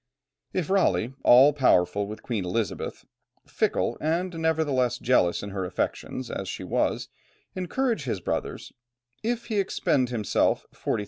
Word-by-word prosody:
If 185 -2 -2
Raleigh, 120 - +2
all 135 +4 +7
powerful 100 -7 +3
with 105 +1 -8
Queen 115 -6 -2
Elizabeth, 95 +2 -3 0.4
fickle - - 0
and 170 +4 0
nevertheless 145 -7 +1
jealous 115 -10 +2
in 100 - -6
her 95 -1 -3
affections 90 - -3
as - - -4
she - - -5
was, - - 0 0.5
encourage 190 - -1
his 115 -6 -2
brothers; - - -4 0.5
if 235 +1 -2
he 215 -3 -1
expend 165 -9 +1
himself 110 -5 +1
40,000_l. - - -2
130 Hz, 135 wpm, -26 LUFS, -, 0.5 s, all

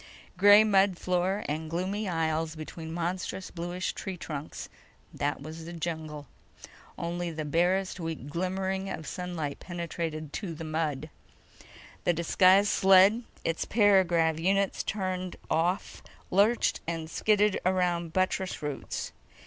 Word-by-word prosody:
Gray 205 +3 +8
mud 195 -3 +3
floor 185 +3 0
and 155 +2 -3
gloomy 190 +5 -2
aisles 160 -1 -1
between 160 +1 -7
monstrous 180 +2 -3
bluish 175 +2 -3
tree 190 -2 -5
trunks—that 145 -2 -6
was 160 +2 -8
the 170 - -7
jungle. 155 -3 -5 0.7
Only 175 +1 -3
the 155 -2 -4
barest 180 +5 +1
weak 165 -5 -5
glimmering 190 +4 -2
of 160 - -5
sunlight 175 -6 -4
penetrated 165 -3 -5
to 180 -6 -4
the 165 - -7
mud. 155 -2 -2 0.9
The 175 - +3
disguised 185 +4 +4
sled—its 190 -2 +3
para 205 -3 +5
grav 165 -2 +1
units 195 +3 +1
turned 185 -3 -3 0.2
off—lurched 190 +5 0
and 165 -1 -3
skidded 210 +4 +2
around 175 -2 +1
buttress 185 -1 -1
roots. 145 -2 -4
175 Hz, 115 wpm, -29 LUFS, 160-190 Hz, 0.9 s, Gray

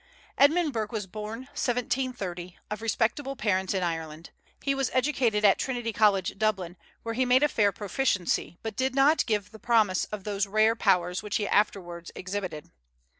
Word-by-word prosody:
Edmund 305 +2 +4
Burke 220 -1 -2
was 215 -4 -3
born, 215 +4 -6
1730, 240 -8 -2
of 210 0 -4
respectable 230 +5 -1
parents 190 -4 0
in 185 - 0
Ireland. 165 -1 -4 0.3
He 275 - +1
was 270 -2 0
educated 250 -5 +1
at 195 - +5
Trinity 240 -4 -2
College, 200 -3 +2
Dublin, 190 -5 0 0.3
where 230 - -3
he 255 +3 +1
made 255 +2 +4
a - - +6
fair 210 -7 +2
proficiency, 200 -4 -1
but 225 -2 -4
did 260 0 -1
not 285 +4 +4
give 210 -1 -1
promise 215 -6 +2
of 210 -2 -7
those 200 -1 -1
rare 215 +2 +3
powers 180 -5 +1
which 210 -1 -4
he 205 - 0
afterwards 175 -5 0
exhibited. 185 -5 -5
210 Hz, 165 wpm, -27 LUFS, 190-245 Hz, 0.3 s, a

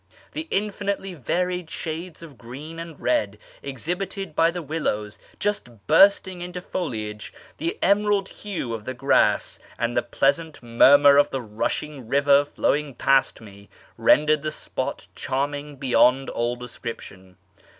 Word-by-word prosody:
The 320 +1 -5
infinitely 200 -1 -2
varied 180 +3 -2
shades 165 +1 -6
of 155 -4 -12
green 135 +9 -9
and 165 -3 -8
red 105 -4 0 0.2
exhibited 175 - -4
by 165 0 +4
the 175 0 -5
willows, 120 -9 -3 0.2
just 120 - -3
bursting 190 +2 +4
into 180 0 -5
foliage, 110 - -5 0.3
the 165 +2 -2
emerald 200 0 +2
hue 185 - -5
of 110 -2 -6
the 130 - -4
grass, 135 +3 +2 0.2
and 120 0 -1
the - - +3
pleasant 155 +1 0
murmur 140 +4 +6
of 145 0 +5
the 135 -2 -4
rushing 125 +5 -3
river 140 +2 +4
flowing 145 -1 -1
past 135 0 +2
me, 100 -2 -14 0.3
rendered 150 0 +4
the 155 - -2
spot - - -5
charming 145 +2 -3
beyond 135 0 +3
all 120 +1 -1
description. 115 -6 -9
145 Hz, 135 wpm, -24 LUFS, 120-175 Hz, 0.3 s, murmur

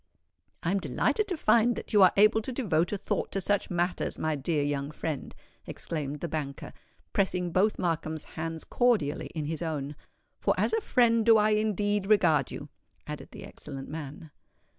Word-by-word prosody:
"I 170 - +1
am 200 - +1
delighted 425 - 0
to 360 - -2
find 235 -2 +4
that - - -7
you 205 - +6
are 185 - +8
able 215 +2 +5
to 240 - -5
devote 180 - 0
a 205 - -1
thought 195 - -2
to 195 - +1
such 200 +1 0
matters, 175 0 -1
my 155 -1 -1
dear 145 +1 0
young 145 -1 -2
friend," 155 -1 -5 0.3
exclaimed 150 -3 -4
the 170 - -2
banker, 145 -4 -5 0.4
pressing 180 -3 0
both 200 +5 +2
Markham's 160 -3 -2
hands 165 0 -5
cordially 225 - +1
in 155 -2 -2
his 160 +1 -3
own; 150 -3 -3 0.4
"for - - +1
as - - +1
a 450 - +2
friend 230 - +3
do 225 0 +6
I 215 0 +3
indeed 205 -1 +1
regard 165 -10 +4
you," - - -8 0.4
added - - -7
the - - -10
excellent 135 0 -8
man. 155 +1 -7
175 Hz, 180 wpm, -28 LUFS, 155-215 Hz, 0.4 s, are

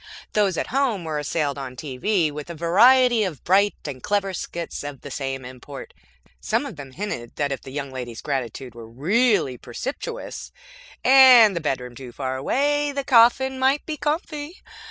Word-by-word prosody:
Those 200 -5 +2
at - - -2
home 255 -9 +1
were 155 -2 -3
assailed 145 -1 -2
on 130 -2 -7
TV 155 +6 -1
with 150 +2 -8
a 170 - -6
variety 235 +8 +5
of 170 -9 -5
bright 200 +3 +3
and 135 -4 -6
clever 200 -2 -1
skits 170 -2 -5
of 145 -2 -7
the 145 - -9
same 135 -1 -4
import. 130 - -10 0.5
Some - - -1
of 270 - -7
them 140 -3 -10
hinted 155 - -5
that, 145 -1 -1
if 135 - -3
the - - -11
young 140 -1 -5
lady's 120 -3 -7
gratitude 130 -3 -4
were 115 -1 -11
really 165 - +1
precipitous, 275 - -6 0.5
and 255 -6 +8
the 170 - -2
bedroom 125 -5 -3
too 125 -1 -10
far 130 +1 -4
away, 290 - 0
the 280 0 -3
coffin 260 +2 +4
might 270 +2 +2
be 310 - -4
comfy. 300 +2 -4
170 Hz, 175 wpm, -23 LUFS, -, 0.5 s, and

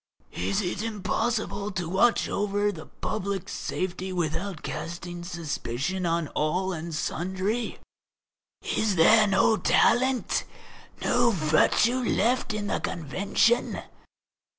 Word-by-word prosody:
Is 95 +2 -1
it 180 +2 -2
impossible 215 -1 -1
to 175 -3 -2
watch 195 +7 +3
over 205 0 0
the 160 -5 -10
public 195 -1 -3
safety 185 +1 -3
without 175 +1 -2
casting 175 +2 -5
suspicion 170 0 -3
on 165 -1 0
all 180 +5 0
and 170 0 -5
sundry? 190 +9 -2 0.9
Is 215 -3 0
there 215 +6 +6
no 195 +3 +3
talent, 255 +7 +2 0.6
no 245 -1 +3
virtue 200 +7 +3
left 245 +1 +1
in 215 -1 -3
the - - -1
Convention? 200 - 0
190 Hz, 105 wpm, -27 LUFS, 170-215 Hz, 0.9 s, there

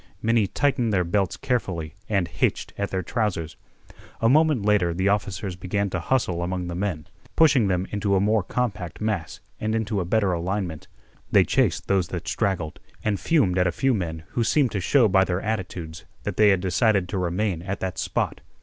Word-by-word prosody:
Many 115 -2 +2
tightened 130 -1 +1
their 95 -3 +2
belts 95 +2 0
carefully 90 - -2 0.2
and 100 -5 +1
hitched - - -1
at 100 - -2
their 95 -1 -2
trousers. 90 -6 -2 0.6
A 115 - +3
moment 150 -4 +3
later 95 -5 +2
the 95 +3 +1
officers 100 -1 -1
began 95 +2 -2
to 85 -3 -3
bustle 95 -10 +1
among 90 +1 -2
the - - -4
men, 90 -5 -2 0.3
pushing 140 -9 +5
them 90 -1 0
into 100 -1 0
a - - +3
more 105 +2 +2
compact 105 -4 -3
mass 105 -7 -3 0.2
and 110 +1 -1
into 110 -2 -1
a 90 - -1
better 100 0 +2
alignment. 90 -1 -3 0.4
They - - +6
chased - - +1
those 95 -3 +2
that 85 -2 -6
straggled 95 -7 -1 0.2
and 105 -2 0
fumed 120 - +2
at 90 - +3
a - - +1
few 135 +9 +1
men 80 -6 -3
who 120 - 0
seemed 130 +1 +2
to 100 - -2
show 125 +5 +4
by 95 -1 +4
their 90 -1 -1
attitudes 90 -7 -4 0.2
that - - -3
they 105 -1 +5
had 95 -2 +3
decided 100 +1 +2
to 100 - -2
remain 90 0 -1
at 95 +2 -4
that 95 -1 -3
spot. - - -2
100 Hz, 195 wpm, -24 LUFS, 90-110 Hz, 0.6 s, They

